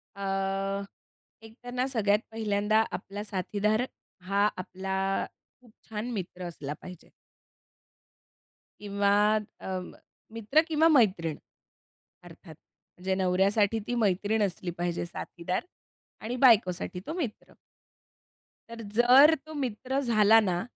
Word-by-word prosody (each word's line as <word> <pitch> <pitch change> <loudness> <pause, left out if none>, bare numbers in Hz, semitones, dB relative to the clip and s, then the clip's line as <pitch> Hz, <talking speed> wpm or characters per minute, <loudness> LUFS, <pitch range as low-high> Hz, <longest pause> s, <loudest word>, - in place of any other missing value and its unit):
अ, 195 0 -2 0.6
एकतर 235 +2 -11
ना 255 +1 0
सगळ्यात 210 -5 +2
पहिल्यांदा 215 0 +1
आपला 195 +3 -6
साथीदार 210 +2 -1 0.5
हा 200 +1 +3
आपला 190 +1 -2 0.4
खूप 240 - -20 0.2
छान 220 +2 -4
मित्र 185 -3 -5
असला 145 -4 -6
पाहिजे. 180 -2 -11 1.7
किंवा 200 -1 0 0.5
अं, 185 -1 -5 0.4
मित्र 230 +8 +2
किंवा 320 0 +3
मैत्रीण, 190 - +3 0.9
अर्थात. - - -13 0.4
म्हणजे 190 +1 -1
नवऱ्यासाठी 195 +4 +2
ती 245 - -1
मैत्रीण 210 0 +1
असली 180 -2 -3
पाहिजे 175 0 -2
साथीदार 175 - -4 0.6
आणि 235 +3 -4
बायकोसाठी 205 -8 +3
तो 315 - -3
मित्र. 300 -11 -5 1.2
तर 230 0 -8
जर 255 +6 +7
तो 315 - -10
मित्र 265 -1 -2
झाला 225 -4 +5
ना, 180 -5 0
205 Hz, 105 wpm, -28 LUFS, 190-230 Hz, 1.7 s, जर